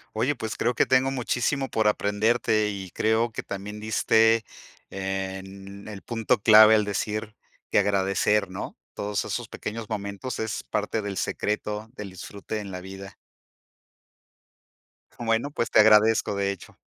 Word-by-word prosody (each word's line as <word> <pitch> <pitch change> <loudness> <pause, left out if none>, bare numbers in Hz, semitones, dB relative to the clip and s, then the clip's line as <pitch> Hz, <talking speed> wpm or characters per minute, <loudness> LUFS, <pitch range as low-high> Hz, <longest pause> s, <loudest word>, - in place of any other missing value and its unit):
Oye, 130 +6 +1
pues 110 0 -5
creo 120 +1 0
que - - +3
tengo 130 +1 +3
muchísimo 135 +1 -1
por 110 -1 +2
aprenderte 105 +1 +1
y 95 -3 -6
creo 110 +2 +1
que - - -5
también 105 +2 -7
diste 110 +1 +3 0.5
en 95 +1 -5
el 100 -2 -8
punto 115 -2 0
clave, 110 +1 +8
al 105 -1 +2
decir 105 +1 -3 0.4
que - - +4
agradecer, 100 +1 +2
¿no?, 95 - -6 0.2
todos 100 -1 -2
esos - - -4
pequeños 110 0 -6
momentos 100 +3 -4
es 110 -1 -3
parte 105 +1 -2
del 100 -2 -5
secreto 105 +3 -2
del 105 -4 -7
disfrute 100 +3 -6
en 100 - -7
la 90 -1 -6
vida. 95 +1 -10 2.0
Bueno, 115 +4 0
pues 115 - -2
te - - +4
agradezco, 105 -1 +5
de 100 0 0
hecho, 100 - -11
105 Hz, 145 wpm, -25 LUFS, 100-110 Hz, 2.0 s, clave